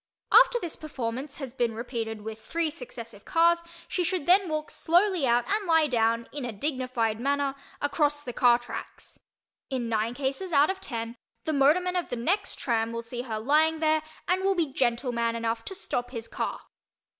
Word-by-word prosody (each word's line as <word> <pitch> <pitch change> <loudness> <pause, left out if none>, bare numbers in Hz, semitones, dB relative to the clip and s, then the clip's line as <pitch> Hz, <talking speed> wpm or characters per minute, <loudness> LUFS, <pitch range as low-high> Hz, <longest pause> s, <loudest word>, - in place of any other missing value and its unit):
After - - +7
this 345 -6 -4
performance 265 -2 -5
has 270 -5 -7
been 240 -4 0
repeated 225 -2 -4
with 220 +1 -7
three 330 +3 -1
successive 235 -7 -9
cars 340 +1 +3 0.3
she 360 - 0
should 355 -3 -1
then 370 +1 +5
walk 310 0 -3
slowly 350 -3 +2
out 240 0 +3
and 410 -1 0
lie 325 -2 +5
down, 230 -3 +1
in 290 -2 -4
a 245 - -3
dignified 250 -2 -1
manner, 280 +1 0 0.3
across 290 0 +1
the 245 - -5
car 240 0 +5
tracks. 240 0 -9 0.5
In 250 -4 -2
nine 225 +2 0
cases 280 +7 -2
out 290 +5 +5
of 380 0 -8
ten 230 -4 -5 0.3
the 315 - -1
motorman 320 +6 +3
of 355 - -1
the - - -2
next 370 - 0
"tram" 230 -2 0
will 230 0 -4
see 240 +1 -5
her 225 -4 -4
lying 310 +6 +3
there 310 0 +3 0.3
and 370 +1 +1
will 390 0 +3
be 320 -6 0
gentleman 235 -2 0
enough 230 0 -2
to 385 - -4
stop 245 -10 -3
his 230 -3 -6
car. - - -3
270 Hz, 185 wpm, -27 LUFS, 235-320 Hz, 0.5 s, After